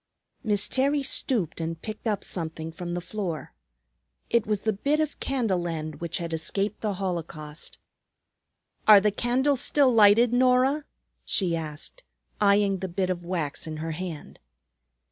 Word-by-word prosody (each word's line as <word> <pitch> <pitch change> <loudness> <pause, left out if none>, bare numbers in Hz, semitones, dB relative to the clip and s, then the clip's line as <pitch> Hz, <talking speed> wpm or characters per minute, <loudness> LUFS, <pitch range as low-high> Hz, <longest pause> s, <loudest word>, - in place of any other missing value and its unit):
Miss 210 -3 +2
Terry 280 +2 +1
stooped 225 - 0
and 165 0 -3
picked 215 +4 -6
up 210 -2 -1
something 160 -2 -4
from 175 +1 -5
the 175 - -3
floor. 185 -7 -4 0.8
It 235 -2 +2
was 210 -2 -1
the 220 - +1
bit 285 +10 0
of 310 -1 -2
candle 215 -10 0
end 155 -2 -5
which 170 - -3
had 170 -2 -4
escaped 195 +6 -1
the 210 -3 -1
holocaust. 165 -5 -5 1.1
"Are 210 -2 +10
the 210 +1 +2
candles 250 +5 +1
still 275 -4 +3
lighted, 225 +2 +6
Norah?" 255 +4 +3 0.4
she 180 -4 +1
asked, 160 - -5 0.4
eyeing 200 -1 +3
the 190 - -3
bit 185 +1 -1
of 175 -1 -4
wax 170 -4 -3
in 155 -1 -5
her 160 +1 -4
hand. 165 -2 -7
195 Hz, 150 wpm, -26 LUFS, 165-235 Hz, 1.1 s, Are